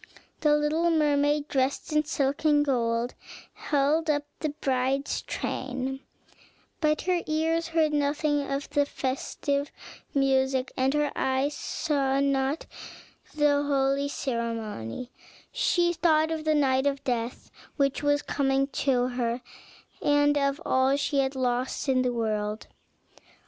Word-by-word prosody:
The 300 -1 +4
little 310 +3 +1
mermaid, 295 -2 +2
dressed 270 +2 -1
in 305 0 +2
silk 285 -2 -1
and 295 -1 +4
gold, 235 -2 0 0.4
held 300 +3 +1
up 290 -1 +2 0.2
the 310 - -1
bride's 270 -1 -1
train; 265 0 -4 0.8
but 305 -1 +1
her 360 -1 0
ears 325 +1 0
heard 320 -2 +1
nothing 290 0 +1
of 275 +1 -2
the 285 -1 +2
festive 280 +2 -2 0.4
music, 265 -1 +2
and 265 +2 +1
her 295 0 +1
eyes 265 +2 0
saw 275 -4 0
not 275 +2 0 0.7
the 295 -1 +3
holy 280 0 +1
ceremony; 230 - -4 0.4
she 350 -8 +2
thought 320 -2 +2
of 315 -1 -3
the 310 0 +3
night 265 -2 +2
of 275 -1 -1
death 240 -1 -3 0.3
which 275 -2 +1
was 290 0 +2
coming 270 -1 +1
to 255 -3 +1
her, 245 -1 -2 0.6
and 290 0 +3
of 280 0 +1
all 260 +1 +3
she 285 0 0
had 270 0 0
lost 255 +1 -1
in 260 -1 +3
the 250 -1 +1
world. 215 -2 -2
280 Hz, 130 wpm, -27 LUFS, 260-295 Hz, 0.8 s, The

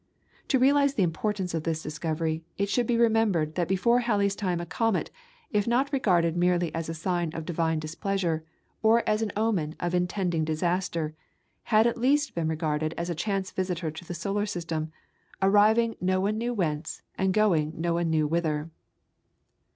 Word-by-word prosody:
To 270 - +3
realise 280 +2 +4
the 200 - +3
importance 185 +2 -1
of 165 - -1
this 160 0 -2
discovery, 160 +1 -2
it 200 0 0
should 240 +3 +1
be 240 - +2
remembered 220 -9 +2
that 175 0 -1
before 235 +6 +3
Halley's 205 -5 +1
time 185 -4 -1
a 170 - -4
comet, 215 +5 0 0.4
if 205 -1 +1
not 265 +4 +1
regarded 175 -10 +2
merely 175 -2 +1
as 165 0 -3
a 165 - -3
sign 175 0 -1
of 165 - -5
divine 160 -1 0
displeasure, 165 +1 -2 0.4
or 225 +1 +4
as 215 +1 +2
an 220 - -1
omen 190 -8 0
of 175 0 -2
intending 180 -2 0
disaster, 165 0 -1 0.5
had 220 0 +4
at 235 0 +1
least 280 +1 +2
been 165 -2 -1
regarded 155 0 -1
as 170 +1 -2
a - - 0
chance 195 +2 -2
visitor 180 -3 -2
to 160 +2 -9
the 175 0 -6
solar 200 +5 -1
system, 165 -5 -3 0.5
arriving 215 +4 +4
no 185 +1 +1
one 210 +3 0
knew 240 +1 -1
whence, 165 -8 -2
and 190 0 +1
going 175 -7 +2
no 170 +1 0
one 170 0 0
knew 155 -1 +2
whither. 160 0 -1
180 Hz, 175 wpm, -27 LUFS, 160-215 Hz, 0.5 s, realise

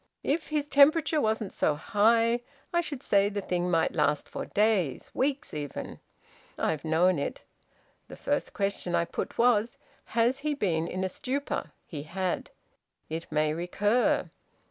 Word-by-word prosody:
If 305 +3 0
his 300 -2 -1
temperature 305 +2 +5
wasn't 220 -3 -1
so 150 - +1
high, 230 +8 +3 0.3
I 345 - +3
should 290 -6 -6
say 200 0 +3
the 205 0 -3
thing 180 -2 -1
might 165 -2 +2
last 150 -1 +1
for - - -6
days 205 - +1
weeks 275 +1 -1
even. 145 -2 -5 0.6
I've 155 -2 -1
known 165 +1 +3
it. - - -4 0.6
The - - -10
first - - -1
question 195 -3 -1
I 170 0 +2
put - - -5
was 235 -1 +3 0.4
has 240 +4 +3
he 295 +1 -1
been 170 - 0
in 185 +2 -3
a - - +1
stupor? 270 +9 -3
He 150 -4 -6
had. 180 +4 -3 0.6
It 165 +1 -5
may 155 0 +2
recur. 205 +8 +1
200 Hz, 150 wpm, -28 LUFS, 170-250 Hz, 0.6 s, temperature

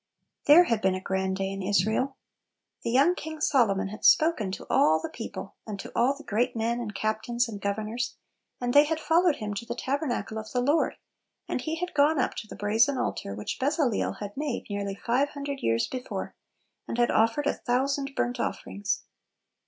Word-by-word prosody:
HPHERE 310 +5 +9
had 230 -6 0
been 190 -2 +2
a - - -3
grand 190 0 -1
day 195 0 -2
in 195 - -5
1 190 - -4
Israel 220 +7 +1 0.6
The - - -2
young 275 +9 +5
King 315 -3 -7
Solo 245 -9 +3
mon 195 0 -2
had 215 +2 -9
spoken 310 - +4
to - - -6
all 160 +1 +4
the - - -5
people, 205 -3 -7
and 205 -2 -5
to - - -7
all 255 +4 +3
the 295 - -11
great 235 0 0
men 230 +1 0
and 210 -4 -5
captains 220 +4 0
and 205 -3 -7
governors, 215 +4 -2 0.4
and 245 0 -1
they 290 +1 +8
had 320 +1 -1
followed 330 0 +3
him 210 -4 -4
to 205 - -4
the 235 0 -5
tabernacle 260 -5 -2
of 215 0 -8
the 250 - +1
Lord, 290 +6 +2 0.5
and - - -2
he 315 +5 -2
had 360 +2 -4
gone 295 +2 +4
up 255 - +1
to 215 - -5
the - - -9
brazen 225 +6 +2
altar 100 - -3
which 105 - -5
Bezaleel 280 -4 +1
had 205 -1 -7
made 290 -3 -3
nearly 200 -1 -2
five 250 +7 +1
hundred 280 -1 -5
years 115 - +1
before, 255 -1 -5 0.5
and - - -3
had 240 0 +3
offered 230 +6 +2
a - - +2
thousand 275 +2 -1
bumt 245 +1 0
oflferings. 200 0 -2
240 Hz, 200 wpm, -27 LUFS, 205-280 Hz, 0.6 s, HPHERE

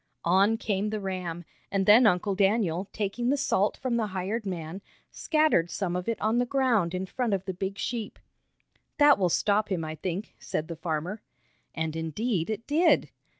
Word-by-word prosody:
On 195 +6 +4
came 210 -2 -1
the 215 0 -3
ram, 180 -3 -4 0.3
and 195 -1 +1
then 220 +4 +7
Uncle 195 +1 +2
Daniel, 195 -2 +1
taking 220 +4 -2
the 285 - +2
salt 210 -7 +1
from 250 -2 -1
the 220 -2 0
hired 200 +3 -3
man, 175 0 -5 0.3
scattered 305 - +2
some 180 -2 -2
of 180 +4 -2
it 230 - -2
on 220 +3 +1
the 245 - +2
ground 235 -10 +1
in 185 +1 -2
front 230 +1 -1
of 190 0 -5
the 190 - -3
big 190 +2 -4
sheep. 230 +1 -4 0.8
"That 290 -5 +6
will 180 -2 +2
stop 205 +4 +1
him, 170 -4 -1
I 155 - -4
think," 185 +5 -5
said 155 - -4
the 170 - -4
farmer. 165 +5 -3 0.5
And 160 -1 -2
indeed 165 +4 -2
it 220 +1 -4
did. 330 +4 +3
195 Hz, 185 wpm, -27 LUFS, 180-225 Hz, 0.8 s, then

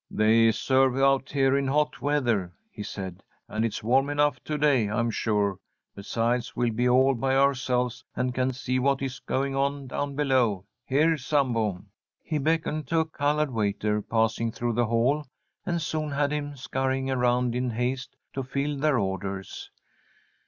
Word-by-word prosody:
"They 110 +1 +4
serve 130 +3 +2
out 135 0 +3
here 135 -1 +2
in 140 -1 +1
hot 150 +2 0
weather," 120 -11 0 0.2
he 105 - -8
said, 95 -2 -6 0.3
"and 110 +1 -2
it's 115 -2 -2
warm 135 +5 +3
enough 145 0 +1
to 150 - -2
day, 140 -8 +3
I'm 115 +2 0
sure. 105 -3 0 0.3
Besides, 115 +4 -2
we'll 120 -2 0
be 125 +3 +1
all 130 +2 +5
by 135 +2 0
ourselves, 130 -2 +1
and 125 0 -1
can 130 +1 0
see 130 0 -2
what 135 +1 +1
is 135 0 -4
going 135 +1 -2
on 140 0 -1
down 140 +2 -3
below. 130 -9 +1 0.2
Here, 155 +4 +3
Sambo!" 115 -9 0 0.4
He 155 -2 -2
beckoned 155 0 0
to 165 -1 +2
a - - -1
coloured 150 -1 0
waiter 105 -1 0
passing 115 +1 0
through 120 +1 -2
the 120 +1 +1
hall, 125 +6 +1 0.4
and 170 -1 0
soon 155 -1 -2
had 145 0 0
him 145 -1 -3
scurrying 130 0 -2
around 125 -1 +1
in 125 +1 -1
haste 125 +3 -3 0.2
to 135 - -2
fill 140 +2 -2
their 150 -2 +2
orders. 95 -1 -4
130 Hz, 165 wpm, -26 LUFS, 115-140 Hz, 0.4 s, all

